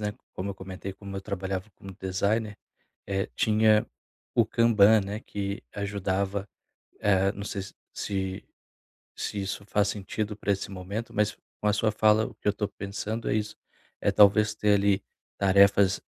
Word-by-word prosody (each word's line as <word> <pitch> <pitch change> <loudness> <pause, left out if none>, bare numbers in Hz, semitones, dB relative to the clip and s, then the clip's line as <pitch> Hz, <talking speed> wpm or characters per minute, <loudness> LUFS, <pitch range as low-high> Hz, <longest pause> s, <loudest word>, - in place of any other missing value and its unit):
né, 105 0 -2 0.2
como 100 +2 -4
eu - - -6
comentei, 95 0 -7
como 100 0 -8
eu 95 - -3
trabalhava 95 +1 -4
no 95 -1 -9
designer, 105 +3 -1 0.5
eh, 95 +1 -1
tinha 110 0 +4 0.5
o 115 -2 +3
Kanban, 110 -2 +5
né, 100 +2 -4
que 100 0 -4
ajudava, 100 0 -2 0.5
eh, 95 -1 +3
não 100 - -7
sei 100 -2 -4
se 100 - -11 0.2
se 95 -2 -3 0.7
se 105 - -3
isso 95 +1 -4
faz 105 0 +1
sentido 105 +1 -3
pra 105 - -1
esse 100 0 -2
momento, 100 +5 -5
mas 105 0 +1 0.2
a 105 0 +3
sua 110 +1 +2
fala, 110 +1 +4
o - - -7
que - - -7
eu 105 - +4
tô 105 0 -2
pensando 105 +4 -4
é - - +2
isso. 105 0 -2 0.5
É - - +2
talvez 105 +1 +5
ter 105 -1 +3
ali 100 0 +2 0.3
tarefas 100 0 +5
100 Hz, 165 wpm, -27 LUFS, 95-105 Hz, 0.7 s, Kanban